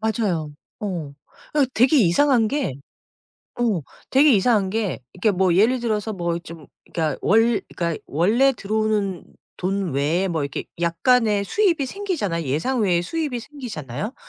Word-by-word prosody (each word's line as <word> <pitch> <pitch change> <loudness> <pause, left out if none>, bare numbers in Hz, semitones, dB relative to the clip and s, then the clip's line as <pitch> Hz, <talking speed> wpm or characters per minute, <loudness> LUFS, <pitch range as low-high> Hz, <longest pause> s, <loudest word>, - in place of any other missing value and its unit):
맞아요. 200 -9 -1 0.3
어. 170 -9 -4 0.4
아 290 -2 +4
되게 255 +6 +4
이상한 230 +4 +4
게 280 - -1 0.9
어 215 -9 +1 0.3
되게 280 +2 +6
이상한 205 -2 +3
게 210 -8 -2
이렇게 195 +4 +1
뭐 185 -2 +3
예를 235 +6 +3
들어서 220 -2 -1
뭐 170 -3 -2
좀 165 -3 -11 0.3
그러니까 155 -4 -1
원 225 +2 +3 0.2
그러니까 170 -2 -2
원래 220 - +3
들어오는 210 -3 -1 0.3
돈 190 -3 -2
외에 160 +8 +1
뭐 160 -4 -1
이렇게 140 - -4 0.2
약간의 205 +5 +2
수입이 350 - +1
생기잖아요, 260 - -3
예상 160 - 0
외에 180 -5 +2
수입이 295 - -3
생기잖아요. 220 - -6
205 Hz, 310 characters per minute, -22 LUFS, 170-245 Hz, 0.9 s, 되게